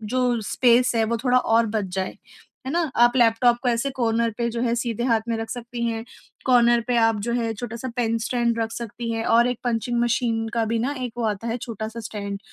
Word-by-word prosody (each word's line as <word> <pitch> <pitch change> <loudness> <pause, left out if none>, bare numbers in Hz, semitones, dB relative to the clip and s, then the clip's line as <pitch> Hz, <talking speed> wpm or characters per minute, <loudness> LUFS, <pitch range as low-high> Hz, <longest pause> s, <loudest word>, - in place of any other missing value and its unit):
जो 250 -2 +2
स्पेस 245 0 +4
है 225 - +3
वो 230 +1 -1
थोड़ा 250 0 +4
और 230 -1 +3
बच 215 -2 -1
जाए। 190 0 -3 0.5
है 265 - -2
ना? 345 - +2
आप 240 +1 +4
लैपटॉप 235 0 +4
को 250 - +2
ऐसे 235 +4 0
कॉर्नर 230 -2 0
पे 235 0 0
जो 235 +1 -3
है 235 -1 +1
सीधे 235 -1 -2
हाथ 230 -3 +2
में 230 - +1
रख 225 0 -5
सकती 240 -1 -5
हैं। 225 0 -3 0.4
कॉर्नर 240 -2 +5
पे 245 - +1
आप 225 -2 +3
जो 235 - -1
है 230 -2 -1
छोटा-सा 235 +3 -6
पेन 230 -1 +1
स्टैंड 235 0 0
रख 225 0 -1
सकती 230 0 -5
हैं 225 0 -2
और 235 +2 +4
एक 245 -2 -2
पंचिंग 240 0 0
मशीन 230 -1 0
का 230 -1 +1
भी 225 +1 -1
ना 270 +5 -1
एक 245 -2 -4
वो 240 - -2
आता 215 +1 -2
है 230 +2 -1
छोटा-सा 225 0 -6
स्टैंड 200 -2 -5
235 Hz, 230 wpm, -23 LUFS, 225-240 Hz, 0.5 s, कॉर्नर